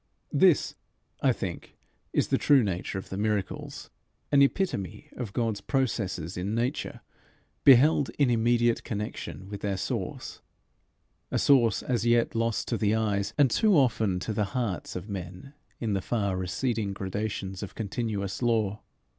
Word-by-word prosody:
This, - - +4 0.5
I - - +4
think, - - -6 0.3
is - - +1
the - - +2
true 140 -4 +5
nature 95 -1 -3
of 95 - -7
the 95 - -4
miracles, 105 -2 -3 0.4
an 140 - +5
epitome 140 - 0
of 120 -5 -5
God's 110 -2 -1
processes 100 - -1
in 100 +4 -2
nature 125 +5 -2 0.6
beheld 140 +2 +6
in 140 -4 +3
immediate 120 0 +2
connection 105 -2 -5
with 100 0 -7
their 100 -2 -1
source - - -4 0.9
a - - 0
source 120 -7 +4
as 120 -4 0
yet 120 0 +3
lost 115 -1 -1
to 115 - 0
the 105 0 +2
eyes 100 -3 -1
and 140 -4 +4
too 210 - +4
often 110 -8 +2
to 110 - -3
the 105 0 0
hearts 110 -8 -2
of 90 +2 -5
men 95 - -7 0.3
in 110 -3 -1
the 95 - 0
far 100 -3 -1
receding 100 +3 -1
gradations 95 0 -4
of 100 - -7
continuous 105 -2 -3
law. 110 -4 +1
110 Hz, 150 wpm, -28 LUFS, 100-120 Hz, 0.9 s, beheld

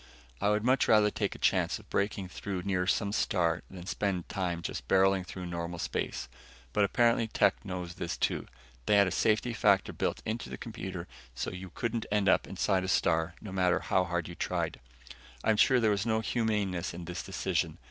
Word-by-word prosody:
I 100 - +3
would 105 0 +2
much 130 +2 +3
rather 105 -1 +5
take - - -2
a - - -8
chance - - +2
of - - -16
breaking 100 -1 0
through 95 0 -4
near 90 -2 0
some 100 0 +1
star 85 -5 +1
than 90 -2 -9
spend 95 -3 -1
time 90 -4 -2
just - - -5
barreling 95 -1 +4
through 90 -1 -6
normal 85 0 -4
space, 65 -7 -3 0.5
but 105 - +3
apparently 115 +2 +3
Tech - - +2
knows 90 -3 -5
this, 85 0 -4
too. - - -1 0.4
They 105 - +5
had 100 0 +6
a 90 - -1
safety 110 +2 +2
factor 100 -3 +3
built - - -2
into 110 +2 -3
the - - -6
computer 95 -6 -6 0.3
so - - -3
you 90 +1 -7
couldn't 115 +4 -3
end 105 -2 +2
up - - +4
inside 95 0 0
a - - -3
star 80 -2 +1
no 105 - -7
matter 90 -1 +2
how 95 - +1
hard 85 -1 -2
you 85 - -7
tried. - - -2 0.6
I'm 110 -1 +3
sure 130 +4 +5
there 110 -2 +3
was 100 -1 +1
no 110 -1 +1
humaneness 105 -8 -1
in 85 0 -7
this 90 +1 -4
decision. - - -1
95 Hz, 200 wpm, -30 LUFS, 90-105 Hz, 0.6 s, had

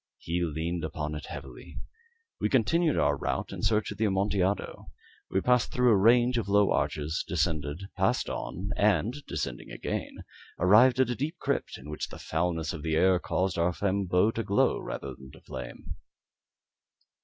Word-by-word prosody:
He 85 +2 -2
leaned 85 +1 -2
upon 75 -1 -3
it 75 - -6
heavily. 65 -4 -9 0.6
We - - 0
continued 155 +6 +2
our 75 0 +3
route - - -3
in - - -6
search 110 -1 +1
of - - -8
the 110 - +2
Amontillado. 100 -1 0 0.4
We 95 - +1
passed 125 +1 +2
through 125 -1 +3
a - - +6
range 120 +4 +4
of 100 - -4
low 100 0 +4
arches, 80 +2 -1
descended, 80 -1 -1
passed 95 +5 +1
on, 100 +4 -4
and 105 - +1
descending - - -4
again, - - -5 0.3
arrived 115 +8 +5
at 130 -2 +3
a - - -1
deep 150 +8 -3
crypt, - - -2
in 65 - -12
which 75 0 -4
the - - -10
foulness 80 +1 -1
of 75 - -6
the 80 0 -1
air 90 +2 +4
caused 90 -1 -1
our 85 +1 +2
flambeaux 95 +1 +1
rather - - -23
to 115 - -2
glow 100 -1 +1
than 65 0 -9
flame. - - -7
95 Hz, 165 wpm, -28 LUFS, 80-110 Hz, 0.6 s, a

